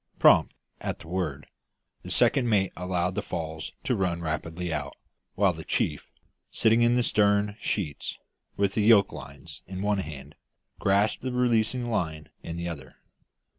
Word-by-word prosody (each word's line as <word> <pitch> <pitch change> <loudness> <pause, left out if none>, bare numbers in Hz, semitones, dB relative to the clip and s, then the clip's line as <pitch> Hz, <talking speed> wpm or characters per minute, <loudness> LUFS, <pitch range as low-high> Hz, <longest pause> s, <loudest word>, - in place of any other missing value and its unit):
Prompt, - - +5 0.2
at - - -3
the 85 - -13
word, 80 -6 -3 0.6
the - - -9
second 125 -3 +3
mate 100 -4 +2
allowed 90 0 -1
the 105 - -1
falls 80 -4 -5
to - - +1
run 90 -3 0
rapidly 80 +1 -3
out, 75 -2 -4 0.4
while - - +3
the - - -8
chief, - - -1 0.4
sitting 115 +1 +3
in 120 +1 +4
the 125 - +3
stern 105 -1 +2
sheets, 90 -8 -3 0.4
with 100 -1 +1
the 110 - +1
yoke 105 -2 +6
lines 70 +1 -10
in 95 +1 -5
one 105 -1 +1
hand, 75 -7 -7 0.5
grasped 100 +2 +2
the 130 - -3
releasing 120 0 +1
line 80 -7 -2
in 85 0 -6
the 85 0 -3
other. 70 -6 -7
95 Hz, 160 wpm, -27 LUFS, 80-105 Hz, 0.6 s, yoke